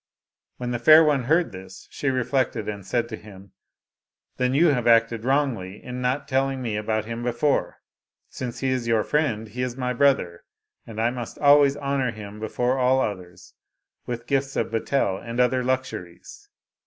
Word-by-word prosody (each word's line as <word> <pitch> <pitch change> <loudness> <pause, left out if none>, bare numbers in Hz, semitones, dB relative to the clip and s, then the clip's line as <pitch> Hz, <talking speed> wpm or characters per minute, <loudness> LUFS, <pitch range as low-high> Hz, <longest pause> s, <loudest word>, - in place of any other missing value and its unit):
When 125 -1 -4
the 120 - -2
fair 155 +6 +8
one 145 -5 +1
heard 165 +6 +2
this, 95 0 -11
she 145 - -2
reflected, 130 -4 -1
and 100 -2 -5
said 120 +4 -1
to 110 - -5
him, 100 -3 -14 0.4
" - - -54
Then 125 +1 +1
you 165 +3 +5
have 125 -5 0
acted 115 -1 +3
wrongly 120 -8 -1
in 125 0 -6
not 125 +3 -1
telling 135 0 0
me 115 -4 -3
about 110 0 -1
him 115 +1 -5
before. 120 +4 0 0.5
Since 125 -2 -6
he 135 - 0
is 130 -2 -1
your 115 -2 +2
friend, 120 -8 -1
he 125 +4 -5
is 125 -1 -3
my 125 -1 -1
brother, 115 -10 +1 0.4
and 110 -1 -7
I 115 +2 +2
must 120 -2 -7
always 145 -1 +5
honor 140 -2 -1
him 105 -2 -8
before 125 +4 -1
all 130 +1 +3
others 90 -6 -5 0.5
with 120 -1 -5
gifts 135 +1 -1
of - - -1
betel 115 -3 0
and 115 +1 -6
other 125 0 +2
luxuries." 130 -9 -5
125 Hz, 180 wpm, -24 LUFS, 110-135 Hz, 0.5 s, fair